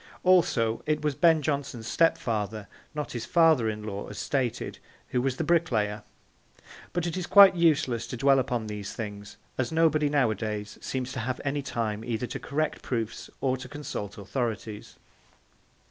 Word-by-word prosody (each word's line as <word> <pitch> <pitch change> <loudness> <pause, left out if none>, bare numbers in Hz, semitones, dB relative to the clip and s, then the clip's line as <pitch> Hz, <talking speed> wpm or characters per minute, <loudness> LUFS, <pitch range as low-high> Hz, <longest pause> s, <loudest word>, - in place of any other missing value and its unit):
Also, 135 -11 +3
it 155 0 0
was 150 -1 +1
Ben 160 0 +4
Jonson's 140 -6 -2
stepfather, 110 - 0 0.3
not 150 -1 -3
his 120 -2 -5
'father 160 -9 +4
in 105 0 -5
law,' 100 -1 -5
as 105 - -9
stated, 130 -4 -2 0.3
who 125 - +1
was 130 0 -1
the - - -1
bricklayer; 120 -11 +1 0.9
but 175 -1 -1
it 170 - -2
is 185 -1 -3
quite 200 -2 +9
useless 150 -8 +2
to 125 - -5
dwell 135 +1 +4
upon 125 -3 -1
these 105 -2 -5
things, 105 -2 -7 0.2
as 130 - 0
nobody 155 -2 +3
nowadays 110 -6 -1
seems 130 -1 -3
to 130 - -4
have 125 +2 -2
any 145 +1 0
time 110 -5 -3
either 120 +1 -2
to - - -5
correct 155 +2 -2
proofs 115 -3 -3
or 130 -1 +2
to 130 0 -9
consult 145 -9 -6
authorities. 110 0 -4
130 Hz, 160 wpm, -27 LUFS, 110-150 Hz, 0.9 s, quite